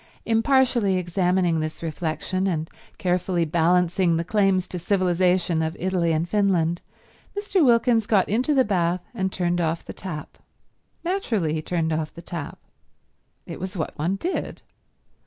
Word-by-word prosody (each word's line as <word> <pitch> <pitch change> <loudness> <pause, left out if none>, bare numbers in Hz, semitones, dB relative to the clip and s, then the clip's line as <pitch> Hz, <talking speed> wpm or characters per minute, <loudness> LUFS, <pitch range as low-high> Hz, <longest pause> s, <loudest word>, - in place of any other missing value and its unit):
Impartially 230 -3 +3
examining 180 -1 +1
this 155 +1 -4
reflection, 165 +4 -2
and 160 -3 -2 0.3
carefully 180 -1 0
balancing 170 +2 +2
the 165 - -1
claims 195 -1 +2
to 180 - -5
civilization 180 -2 +1
of 160 +1 -2
Italy 180 -2 +1
and 160 +2 0
Finland, 175 -4 +1 0.6
Mr. 405 -4 +1
Wilkins 235 -3 +3
got 200 -4 +3
into 250 +8 +1
the 260 -2 +4
bath 180 -2 0
and 190 0 -1
turned 175 -1 0
off 165 0 -1
the - - -7
tap. 170 -5 -7 0.6
Naturally 240 - 0
he 155 - -1
turned 160 -1 -1
off 155 0 -3
the 170 - -10
tap. 165 -4 -6 0.9
It - - -7
was 185 +2 -5
what 155 - -3
one 170 +6 -1
did. 345 - -4
180 Hz, 145 wpm, -24 LUFS, 165-200 Hz, 0.9 s, the